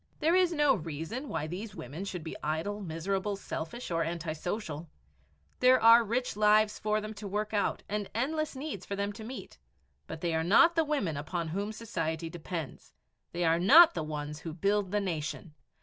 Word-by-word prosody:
There 320 Hz, +2 st, +3 dB
is 365 Hz, -1 st, +4 dB
no 295 Hz, -4 st, +4 dB
reason 170 Hz, -, -5 dB
why 150 Hz, -, -2 dB
these 195 Hz, +7 st, -6 dB
women 150 Hz, +10 st, -6 dB
should 180 Hz, -4 st, -5 dB
be 160 Hz, -, -6 dB
idle, 160 Hz, +8 st, -2 dB
miserable, 190 Hz, +4 st, -2 dB
selfish, 195 Hz, +3 st, -6 dB
or 165 Hz, 0 st, +1 dB
antisocial. 165 Hz, 0 st, -4 dB, 0.7 s
There 255 Hz, 0 st, +6 dB
are 230 Hz, +1 st, +8 dB
rich 235 Hz, +2 st, -1 dB
lives 210 Hz, 0 st, +4 dB
for 215 Hz, 0 st, +1 dB
them 215 Hz, 0 st, -6 dB
to 205 Hz, -1 st, -7 dB
work 210 Hz, +2 st, -2 dB
out 205 Hz, -, 0 dB
and 205 Hz, -1 st, -3 dB
endless 305 Hz, +5 st, -1 dB
needs 265 Hz, -, -5 dB
for 200 Hz, -, -4 dB
them 200 Hz, +1 st, -2 dB
to 220 Hz, -, -9 dB
meet. 230 Hz, -4 st, -8 dB, 0.5 s
But 160 Hz, -, -7 dB
they 170 Hz, -2 st, 0 dB
are 160 Hz, 0 st, +1 dB
not 280 Hz, -, +5 dB
the 325 Hz, -1 st, +3 dB
women 210 Hz, -, -1 dB
upon 160 Hz, +3 st, -3 dB
whom 200 Hz, +5 st, -2 dB
society 165 Hz, -7 st, -3 dB
depends; 165 Hz, -4 st, -7 dB, 0.4 s
they 175 Hz, 0 st, -1 dB
are 165 Hz, +1 st, +3 dB
not 325 Hz, -, +8 dB
the -, -, -2 dB
ones 150 Hz, -1 st, -5 dB
who 160 Hz, -1 st, -7 dB
build 200 Hz, +2 st, +1 dB
the 210 Hz, +2 st, +1 dB
nation. 165 Hz, -3 st, -4 dB
200 Hz, 185 wpm, -30 LUFS, 165-225 Hz, 0.7 s, are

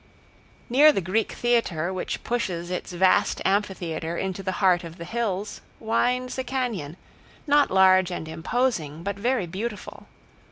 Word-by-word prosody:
Near 285 Hz, +5 st, +6 dB
the 290 Hz, -, -1 dB
Greek 195 Hz, +5 st, -1 dB
Theater, 190 Hz, -8 st, 0 dB
which 185 Hz, -, -4 dB
pushes 180 Hz, -7 st, -2 dB
its 180 Hz, -, -4 dB
vast 185 Hz, +1 st, +2 dB
amphitheater 175 Hz, -5 st, -1 dB
into 190 Hz, 0 st, -3 dB
the 190 Hz, 0 st, -3 dB
heart 185 Hz, -3 st, +3 dB
of 165 Hz, 0 st, -9 dB
the 170 Hz, -, -7 dB
hills, 210 Hz, -1 st, -3 dB, 0.2 s
winds 250 Hz, +3 st, 0 dB
a -, -, -1 dB
cañon, 235 Hz, -, -3 dB, 0.5 s
not 290 Hz, -1 st, +4 dB
large 185 Hz, -1 st, +5 dB
and 170 Hz, -3 st, -5 dB
imposing, 165 Hz, -, -2 dB
but 200 Hz, +1 st, -2 dB
very 240 Hz, -2 st, 0 dB
beautiful. 205 Hz, +5 st, -6 dB
190 Hz, 145 wpm, -25 LUFS, 175-235 Hz, 0.5 s, Near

